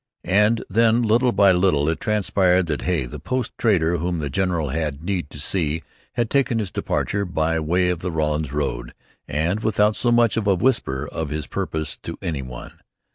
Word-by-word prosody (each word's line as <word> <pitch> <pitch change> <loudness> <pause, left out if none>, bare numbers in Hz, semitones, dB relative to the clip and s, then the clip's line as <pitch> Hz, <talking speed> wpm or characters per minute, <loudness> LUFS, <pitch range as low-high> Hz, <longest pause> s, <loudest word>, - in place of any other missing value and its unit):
And 105 +5 +3
then, 115 +3 +3
little 120 +3 +3
by 100 -4 +5
little, 90 -5 +2
it 80 - 0
transpired 95 -4 +2
that 75 -3 -3
Hay, 85 -8 0
the - - -8
post 130 -1 -2
trader 85 -7 +2
whom 85 +2 -2
the 75 -3 -3
general 85 -2 0
had 75 0 -3
need 90 -5 -2
to - - -11
see, 80 0 -1 0.3
had 120 -1 0
taken 130 -1 +1
his 105 -4 -2
departure 100 0 -1
by 80 -3 0
way 90 +3 +1
of 90 -2 -1
the 90 - -3
Rawlins 75 -2 -1
road, - - -3 0.3
and 85 +8 0
without 105 -1 +2
so 120 - +1
much 120 -2 +3
as 105 -2 -1
a 100 - +4
whisper 85 - 0
of 80 -1 -4
his 75 +1 -3
purpose 80 -2 -3
to - - -7
any 75 -5 -3
one. 65 -2 -10
90 Hz, 190 wpm, -22 LUFS, 75-105 Hz, 0.3 s, by